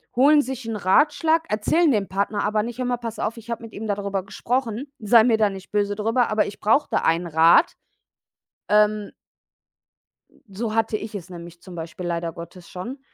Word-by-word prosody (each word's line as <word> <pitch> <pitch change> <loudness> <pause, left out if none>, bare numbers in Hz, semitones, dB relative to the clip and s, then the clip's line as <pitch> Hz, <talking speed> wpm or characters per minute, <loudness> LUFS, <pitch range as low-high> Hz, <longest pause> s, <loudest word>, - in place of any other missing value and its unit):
holen 290 +4 +6
sich 260 -2 -6
'n 225 - -3
Ratschlag, 310 - +3
erzählen 295 +9 +2
dem 205 -4 0
Partner, 200 +2 -1
aber 210 0 +1
nicht: 240 +1 -6
„Hör 255 - -2
mal, 245 -1 0
pass 230 -2 -7
auf, 225 - -2
ich 230 +1 -12
habe 230 - -4
mit 225 - -11
ihm 220 +1 -6
darüber 200 -2 -2
gesprochen. 240 +4 -3
Sei 220 +1 +5
mir 225 -3 +3
da 210 -2 +3
nicht 195 -1 -10
böse 205 -1 0
drüber, 225 +3 +1
aber 215 0 +2
ich 205 - -8
brauche 270 +8 +3
da - - +1
einen 170 +2 +1
Rat.“ 165 - +5 1.0
Ähm 210 0 +2 1.4
So 215 +3 -4
hatte 225 -1 +1
ich 215 0 -8
es 185 -2 -7
nämlich 170 -1 -11
zum 185 -2 -11
Beispiel 170 +2 -7
leider 170 -1 -3
Gottes 170 +1 -11
schon 235 +10 -7
215 Hz, 190 wpm, -23 LUFS, 190-235 Hz, 1.4 s, holen